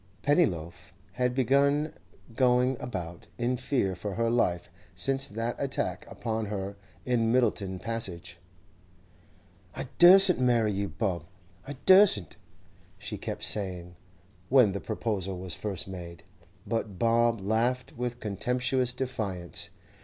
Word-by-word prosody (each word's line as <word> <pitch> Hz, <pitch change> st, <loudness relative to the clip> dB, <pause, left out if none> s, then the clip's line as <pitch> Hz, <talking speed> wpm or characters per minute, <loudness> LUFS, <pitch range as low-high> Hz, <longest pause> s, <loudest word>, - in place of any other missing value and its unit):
Pennyloaf 90 Hz, -, 0 dB, 0.2 s
had 125 Hz, 0 st, -1 dB
been 140 Hz, +4 st, +2 dB, 0.4 s
going 125 Hz, +1 st, +3 dB
about 85 Hz, -8 st, -6 dB
in 120 Hz, +1 st, 0 dB
fear 125 Hz, -7 st, -1 dB
for 95 Hz, +2 st, -5 dB
her 115 Hz, 0 st, 0 dB
life 90 Hz, -8 st, +1 dB, 0.3 s
since 135 Hz, 0 st, +1 dB
that 115 Hz, +3 st, -3 dB
attack 135 Hz, -1 st, -3 dB
upon 110 Hz, -2 st, -3 dB
her 100 Hz, -1 st, -4 dB, 0.3 s
in 115 Hz, -3 st, +1 dB
Myddelton 105 Hz, -6 st, +1 dB
Passage. 90 Hz, -6 st, -4 dB, 1.4 s
'I -, -, -5 dB
dursn't 185 Hz, 0 st, +8 dB
marry 120 Hz, -4 st, +2 dB
you, 100 Hz, +1 st, -2 dB
Bob! 85 Hz, +2 st, -3 dB, 0.4 s
I 145 Hz, -, -5 dB
dursn't!' 185 Hz, -, +5 dB, 0.6 s
she -, -, -5 dB
kept -, -, -5 dB
saying, 90 Hz, -4 st, 0 dB, 0.5 s
when 125 Hz, -6 st, +5 dB
the 100 Hz, -, -4 dB
proposal 100 Hz, -4 st, -3 dB
was 90 Hz, -1 st, -3 dB
first 100 Hz, +2 st, -4 dB
made. 85 Hz, -3 st, -9 dB, 0.4 s
But 110 Hz, -3 st, -3 dB
Bob 115 Hz, +1 st, +2 dB
laughed 115 Hz, +6 st, -1 dB
with 120 Hz, 0 st, -4 dB
contemptuous 125 Hz, +4 st, 0 dB
defiance. 100 Hz, -9 st, -3 dB
115 Hz, 120 wpm, -28 LUFS, 95-125 Hz, 1.4 s, dursn't